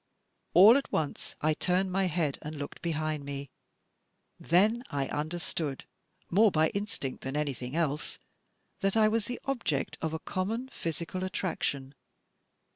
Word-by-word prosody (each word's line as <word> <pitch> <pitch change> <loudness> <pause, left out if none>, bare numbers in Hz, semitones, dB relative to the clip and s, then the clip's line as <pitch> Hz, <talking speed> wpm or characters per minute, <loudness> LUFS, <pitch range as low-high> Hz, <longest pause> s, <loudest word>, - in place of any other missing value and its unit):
All 210 +8 +10
at 280 - -3
once, 150 -2 -2
I 155 +1 +3
turned 185 +4 +1
my 195 +1 +2
head 160 -5 0
and 150 +1 -6
looked 145 -1 -6
behind 155 -3 -1
me. 140 -1 -6 0.9
Then 210 +8 +3
I 140 -1 -1
imderstood, 155 -2 -3 0.5
more 210 +5 +6
by 160 -3 +3
instinct 200 -10 -4
than 135 +2 -3
anything 140 -3 -2
else, 155 -3 -1 0.6
that 195 +1 +1
I 215 -1 +6
was 220 0 +1
the 245 - -4
object 240 - -1
of 160 0 -1
a - - -3
common 220 +9 -2
physical 170 - -4
attraction. 145 -8 -2
165 Hz, 140 wpm, -30 LUFS, 150-195 Hz, 0.9 s, All